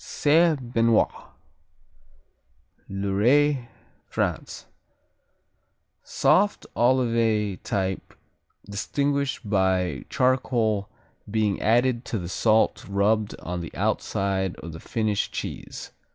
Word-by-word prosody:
Saint 150 -5 +2
Benoit 115 -1 +3 1.8
Loiret, 120 +8 +2 0.4
France - - -3 1.4
Soft 205 +2 +2
Olivet 115 -5 +1
type 95 -3 -3 0.5
distinguished 140 +5 -2
by 95 -3 +1
charcoal 125 -6 +1 0.4
being 105 -2 0
added 120 +2 +2
to 115 - -3
the 85 -3 -5
salt 110 +3 +2
rubbed 105 +2 +1
on 90 0 -4
the 85 - -7
outside 95 -2 -1
of 85 - -9
the 80 - -8
finished 110 0 -1
cheese. - - -6
110 Hz, 85 wpm, -25 LUFS, 100-125 Hz, 1.8 s, Benoit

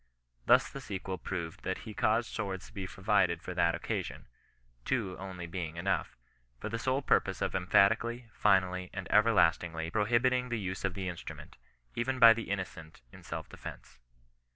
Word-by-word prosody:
Thus - - +6
the - - -8
sequel 95 -1 -5
proved 85 -4 -5
that 95 - -2
he 110 - -7
caused 110 +1 +1
swords 95 -3 -3
to - - -16
be 95 -4 -4
provided 95 -3 +1
for 90 - -5
that 85 -2 +2
occasion - - -4 0.6
(two 105 - -1
only 95 -2 -6
being 85 -2 -5
enough) 95 +3 -1 0.4
for - - -4
the 115 - -3
sole 130 +4 0
purpose - - +2
of - - -1
emphatically, 110 +6 +3
finally, 90 -3 +2
and 95 -2 -4
everlastingly 85 -6 +3
prohibiting 120 +4 +2
the 120 -1 -1
use 95 -2 -4
of 95 -1 -1
the 95 -2 -3
in 90 -2 -4
strument, - - -9 0.4
even 130 +3 -1
by 115 -2 +9
the 115 0 -6
innocent 80 -8 -5
in - - -13
self - - -6
defence. 60 0 -10
95 Hz, 170 wpm, -31 LUFS, 90-115 Hz, 0.6 s, by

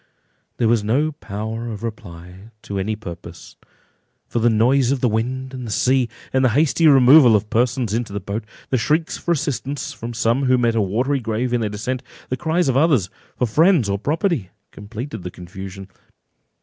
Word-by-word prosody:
There 115 - +2
was 115 -2 +2
no 140 +9 +1
power 110 -3 -6
of 110 -1 -7
reply 90 -2 -8
to 100 -1 -4
any 105 +3 -1
purpose, 100 -6 -10 0.7
for 120 - -2
the 120 +1 +3
noise 125 +4 +3
of 140 - 0
the 125 - +2
wind 130 +4 -2
and 125 -4 -6
sea, 130 +2 +2 0.2
the 130 -1 +3
hasty 150 +5 +3
removal 135 -3 +7
of 105 +1 -1
persons 120 -1 +1
into 115 -1 -2
the 100 - -3
boat, 100 +3 -4 0.3
the 130 - +2
shrieks 155 +9 0
for 175 - -2
assistance 145 -3 -2
from 115 0 -7
some 120 +4 +1
who 130 0 +4
met 120 -2 +2
a 115 - +1
watery 125 +8 0
grave 120 +1 -2
in 120 - +1
their 110 - -1
descent, 125 +5 -3 0.3
the 130 - 0
cries 170 +3 0
of 130 - +1
others 135 - +3 0.3
for 125 - +1
friends 155 - +3
or 100 0 -1
property 150 - -1 0.2
completed 110 +3 -7
the 90 - -5
confusion. 95 +2 -9
120 Hz, 180 wpm, -21 LUFS, 105-135 Hz, 0.7 s, removal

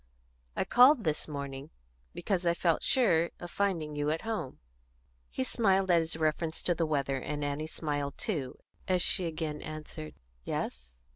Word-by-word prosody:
"I - - +1
called 250 0 +6
this 155 -3 -1
morning 140 -2 -5 0.5
because 185 -3 -1
I 170 -1 +2
felt 170 -2 +2
sure 170 -10 +3
of 175 0 -7
finding 170 -7 -1
you 145 0 0
at 160 +1 0
home." 220 - -3 0.7
He 130 - -2
smiled 190 - +2
at 170 - +6
his 160 0 -2
reference 160 +1 -1
to 175 - +2
the 165 -1 0
weather, 140 -3 0
and 145 +2 -4
Annie 145 +2 -2
smiled 145 -3 -3
too 155 - -3 0.3
as 180 -1 +2
she 185 -3 +1
again 155 -2 -3
answered, 155 0 -7 0.3
"Yes?" - - -4
160 Hz, 160 wpm, -31 LUFS, 145-180 Hz, 0.7 s, called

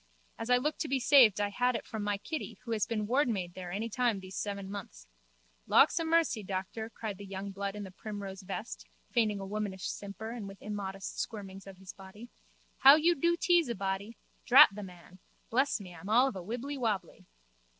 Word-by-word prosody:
As 225 - -5
I 250 - +6
look 300 +5 -2
to - - -2
be 275 -1 0
saved 240 -6 +6
I 205 0 +1
had 245 +4 +1
it - - -4
from 220 - -5
my 205 0 -1
Kitty 230 - -6
who 235 - -6
has 215 -2 0
been 215 -2 -2
wardmaid 220 -8 0
there 180 -1 -7
any 210 +5 -2
time 230 -2 0
these 190 0 -10
seven 200 -2 -4
months. 195 - -8 0.6
Lawksamercy, 325 -5 +3
doctor, 195 +4 -4
cried 215 -4 -6
the - - -8
young 195 +1 -5
blood 200 +1 -4
in 210 - -5
the 190 - -9
primrose 200 -1 -7
vest, 195 +4 -6 0.2
feigning 215 -5 +1
a 195 - -5
womanish 200 -2 -4
simper 205 +2 -7
and 230 -4 -6
with 195 -1 -11
immodest 195 -2 -5
squirmings 195 -3 -6
of 195 -1 -11
his 190 0 -10
body, 200 +5 -12 0.5
how 275 +2 +10
you 325 +3 +4
do 340 +2 +1
tease 345 -7 +3
a 235 - -2
body! 195 +3 -3 0.3
Drat 275 +5 +9
the 210 - -7
man! 180 -1 -12 0.3
Bless 265 +3 +2
me, 185 -3 -10
I'm 175 +4 -10
all 245 +5 +5
of 265 - -4
a 185 - -5
wibbly 250 +9 -5
wobbly. 205 -8 -3
210 Hz, 200 wpm, -31 LUFS, 195-245 Hz, 0.6 s, how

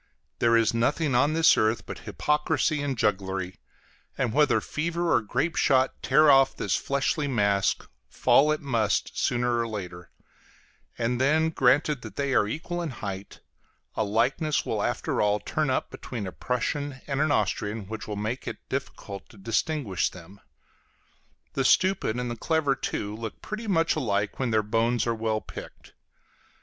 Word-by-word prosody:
There 115 0 +4
is 115 -1 +2
nothing 135 +5 +1
on 140 +5 +3
this 165 0 +5
earth 110 0 +1
but - - -7
hypocrisy 150 0 +1
and 140 -3 -2
jugglery; 95 -3 -1 0.6
and 125 -5 0
whether 150 +2 +4
fever 170 +2 -1
or - - +4
grape 135 +10 -1
shot 130 -1 +2
tear 150 +2 +5
off 135 -1 +5
this - - 0
fleshly 140 +2 0
mask, 100 -6 +1 0.2
fall 150 +2 +4
it 155 - -1
must 115 -7 0
sooner 120 -1 +1
or 115 - 0
later: 90 -5 -7 0.9
and 120 +2 0
then, 160 +4 +3
granted 140 +1 +2
that 110 - -9
they 140 -1 -1
are 105 - +3
equal 175 +8 -4
in 170 - -3
height, 100 -6 -7 0.5
a - - 0
likeness 125 +9 +1
will - - -1
after - - -1
all 105 0 +2
turn 155 +6 -1
up 130 - -1
between 115 -5 -6
a 95 - -5
Prussian 135 +5 -2
and 140 0 -1
an 155 -1 +2
Austrian 105 -2 -1
which 110 +2 -7
will 105 - -4
make 110 +5 -4
it - - -7
difficult 100 -1 -5
to - - -16
distinguish 115 - -1
them. 90 +3 -14 1.1
The 135 - 0
stupid 185 - +3
and 125 -1 -3
the - - -3
clever, 155 +2 +1
too, 105 -5 -4
look 110 -1 -7
pretty 215 +1 -5
much 165 -4 +2
alike 105 -8 -1
when 130 -2 0
their 110 -1 +2
bones 115 +3 +1
are 115 - +1
well 110 -1 -1
picked. - - -11
125 Hz, 165 wpm, -26 LUFS, 105-150 Hz, 1.1 s, this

